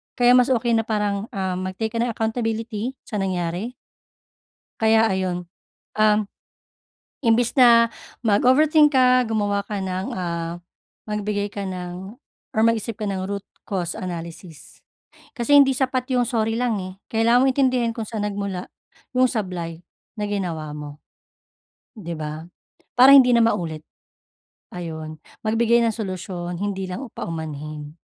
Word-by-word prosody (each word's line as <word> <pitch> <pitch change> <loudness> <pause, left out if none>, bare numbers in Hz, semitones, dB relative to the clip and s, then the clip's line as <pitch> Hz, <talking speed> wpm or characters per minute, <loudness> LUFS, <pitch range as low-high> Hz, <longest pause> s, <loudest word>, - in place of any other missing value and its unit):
Kaya 245 -1 +5
mas 250 +1 +4
okey 235 -1 +1
na 225 - 0
parang, 210 -2 -1
um, 190 -3 -3
mag-take 185 +4 -3
ka 230 - -3
ng 240 - +1
accountability 225 +1 -2
sa 210 - -5
nangyari. 185 +4 -2 1.1
Kaya 220 0 +5
ayon, 185 -3 -1 0.5
um, 215 0 +4 1.0
imbis 235 -1 +2
na 235 -2 +7 0.3
mag-overthink 290 +7 +4
ka, 255 -1 +5
gumawa 205 -2 0
ka 200 -2 -3
ng, 185 0 -3
ah, 170 -2 -3 0.5
magbigay 210 -1 -2
ka 200 -2 -4
ng 185 +2 -6 0.4
or 220 - +3
mag-isip 230 -1 +1
ka 220 - -7
ng 190 -1 -3
root 200 0 -4 0.2
cause 180 -4 -2
analysis. 170 -4 -8 0.6
Kasi 265 +4 +3
hindi 270 -1 +5
sapat 255 -1 0
'yung 245 - +3
sorry 225 -2 0
lang 235 -3 0
eh. 185 0 -6 0.2
Kailangan 230 +3 +4
mong 270 - +4
intindihin 255 -3 +2
kung 225 -2 -5
saan 215 -2 -4
nagmula 200 -3 -4 0.5
'yung 255 0 +5
sablay 180 -7 -4 0.3
na 210 -2 -2
ginawa 170 -7 -3
mo. 150 0 -9 0.9
‘Di 170 -6 -7
ba? 155 +1 -5 0.6
Para 265 +2 +9
hindi 255 -3 +8
na 235 - +5
maulit. 160 -8 -1 0.9
Ayun, 160 -3 -6 0.3
magbigay 235 +2 +3
ng 225 - +1
solusyon, 180 -4 -5
hindi 195 -2 -2
lang 245 +9 -5
paumanhin. 150 -2 -6
210 Hz, 135 wpm, -23 LUFS, 180-235 Hz, 1.1 s, Para